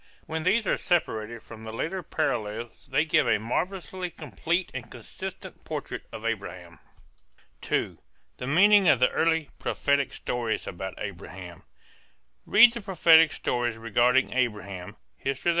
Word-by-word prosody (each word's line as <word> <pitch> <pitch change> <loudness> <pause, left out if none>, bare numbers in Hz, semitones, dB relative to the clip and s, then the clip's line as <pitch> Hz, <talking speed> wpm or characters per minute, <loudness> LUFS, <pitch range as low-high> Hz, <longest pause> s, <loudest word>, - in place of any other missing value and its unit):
When 160 0 -3
these 205 +7 +2
are - - +1
separated 115 -10 -1
from 110 -1 -11
the 110 - -6
later 165 +11 -3
parallels 120 -8 -3
they 145 +4 +1
give 155 - +3
a - - +4
marvelously 180 - -3
complete 165 - -2
and - - -6
consistent - - -9
portrait - - -5
of 110 - -8
Abraham. 95 -7 -5 0.9
II. - - 0 0.4
THE 125 - -5
MEANING 195 +6 +6
OF 135 - +5
THE 125 - +4
EARLY 160 -2 +1
PROPHETIC 140 -2 0
STORIES 120 -2 -3
ABOUT 95 +2 -6
ABRAHAM. 90 -3 -8 0.9
Read 240 - +8
the 235 - -5
prophetic 165 -5 +5
stories 120 -2 -1
regarding 120 +3 +2
Abraham 105 -6 -2 0.3
(_Hist. 135 0 -3
125 Hz, 135 wpm, -27 LUFS, 110-165 Hz, 0.9 s, Read